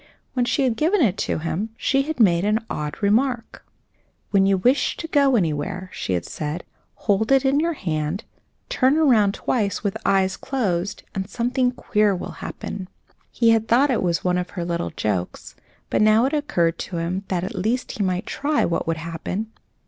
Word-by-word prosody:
When 250 -2 +1
she 270 - +1
had 245 -4 +1
given 355 +7 +2
it 200 -6 +2
to - - +1
him 165 +7 -2
she 275 - +2
had 300 0 -4
made 175 -6 +4
an 215 +2 +1
odd 150 +4 -4
remark. 230 +3 +1 0.7
"When 195 -1 +4
you 195 -1 +3
wish 250 +9 +2
to 325 - -5
go 280 -4 +3
anywhere," 175 0 -1
she 95 - -3
had 85 -2 -1
said, 155 +2 -4 0.3
"hold 220 +3 0
it 270 0 +4
in 270 +2 +3
your 335 +2 +1
hand, 160 - -2 0.4
turn 265 +3 +2
around 225 -10 +4
twice 210 -5 -1
with 200 -2 0
closed - - -6
eyes, 195 -1 0 0.2
and 190 0 -4
something 245 +3 0
queer 210 -4 +1
will 180 - -5
happen." 190 -2 -6 0.4
He 230 -1 +3
had 225 0 +2
thought 265 +5 +4
it 235 - +1
was 170 -2 0
one 180 0 +1
of 180 - -4
her 170 - -2
little 170 0 -2
jokes, 95 -4 -3 0.4
but - - +2
now 215 +2 +5
it 275 - -1
occurred 180 - 0
to 180 - -4
him 175 +4 -2
that 180 -2 -1
at 185 - -4
least 225 +7 -1
he - - +2
might 185 -1 -1
try 295 +1 0
what 170 - -1
would 165 0 0
happen. 170 +6 -4
205 Hz, 190 wpm, -23 LUFS, 175-250 Hz, 0.7 s, now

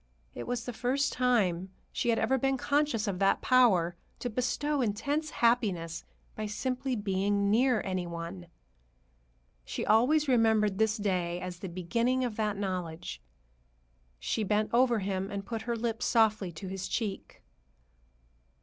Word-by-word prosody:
It 120 - -7
was 245 -1 -2
the 245 - -4
first 255 +5 0
time 195 -8 +1 0.2
she 240 - -1
had 230 - +3
ever 260 +4 +2
been 270 +1 +1
conscious 280 -5 +1
of 190 -3 -2
that 195 0 +3
power 195 -10 +4 0.2
to 245 - -4
bestow 270 +5 0
intense 280 +8 -1
happiness 195 - 0 0.3
by 215 0 -3
simply 255 +4 -2
being 200 -1 0
near 245 0 +3
any 185 -2 -2
one. 170 +1 -6 1.2
She - - -4
always 275 +8 +4
remembered 220 -5 +3
this 220 -1 +2
day 180 -4 -1
as 180 -1 -6
the 190 - -6
beginning 230 +9 0
of 235 -3 -3
that 210 -2 0
knowledge. 180 - -4 1.0
She 215 - -1
bent 210 +1 +1
over 240 -1 +4
him 195 -1 -2
and 200 -1 -5
put 225 -2 -4
her 235 - +1
lips 230 0 -2
softly 215 -5 +3
to 175 +5 -7
his 190 0 -4
cheek. 210 -5 -4
215 Hz, 150 wpm, -30 LUFS, 190-245 Hz, 1.2 s, power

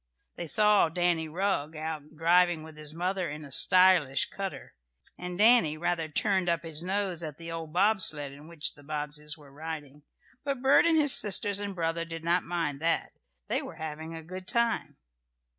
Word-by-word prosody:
They 170 - -6
saw 210 -1 +4
Danny 170 -1 0
Rugg 165 -3 -2
out 155 -1 -5
driving 175 0 +3
with 160 -1 -12
his 150 -1 -7
mother 180 +2 -2
in 150 +1 -7
a 140 - -11
stylish 180 -5 +4
cutter, 195 -1 -6 0.5
and 180 0 -6
Danny 210 -8 +5
rather 165 0 -1
"turned 190 +2 0
up 170 -1 0
his 160 -2 -1
nose" 190 -1 -1
at 155 -3 -7
the 165 0 -6
old 165 -2 -6
bob 200 +4 +2
sled 145 -4 +1
in 145 +2 -14
which 150 -4 -4
the 145 - -13
Bobbseys 150 0 -4
were 145 -3 -17
riding. 150 -2 -8 0.4
But 280 -2 -3
Bert 270 +5 +5
and 330 -1 +3
his 290 -3 +6
sisters 205 -1 +4
and 200 -1 -4
brother 165 -1 -1
did 165 -1 -8
not 175 +2 +2
mind 165 -5 -3
that. 165 +2 0 0.4
They - - -1
were - - -9
having 160 +1 -6
a 160 - -8
good 185 +3 -8
time. 235 +1 -1
165 Hz, 185 wpm, -28 LUFS, 155-185 Hz, 0.5 s, his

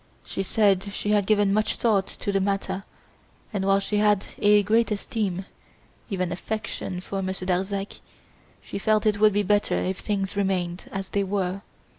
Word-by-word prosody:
She - - -3
said 195 -1 +3
she 210 - -1
had 205 -2 +2
given 205 -2 +3
much 215 +1 +1
thought 205 -5 +2
to 200 - -4
the 195 -1 +1
matter 195 0 -1 0.7
and 200 -2 -1
while 195 0 +4
she 205 +1 -1
had 210 -1 +3
a 205 0 +5
great 225 +3 +3
esteem, 200 -3 -2 0.6
even 185 -4 -1
affection, 195 -1 -4
for 195 +1 -4
Monsieur 190 0 -3
Darzac, 195 +2 -2 0.6
she - - -5
felt 215 +1 +2
it 210 -1 +2
would 215 0 +6
be 205 +1 +2
better 205 +1 +2
if 190 +1 -1
things 195 -2 -2
remained 185 -3 -1
as 195 -1 -4
they 200 - 0
were. 195 -1 -1
200 Hz, 170 wpm, -25 LUFS, 190-210 Hz, 0.7 s, would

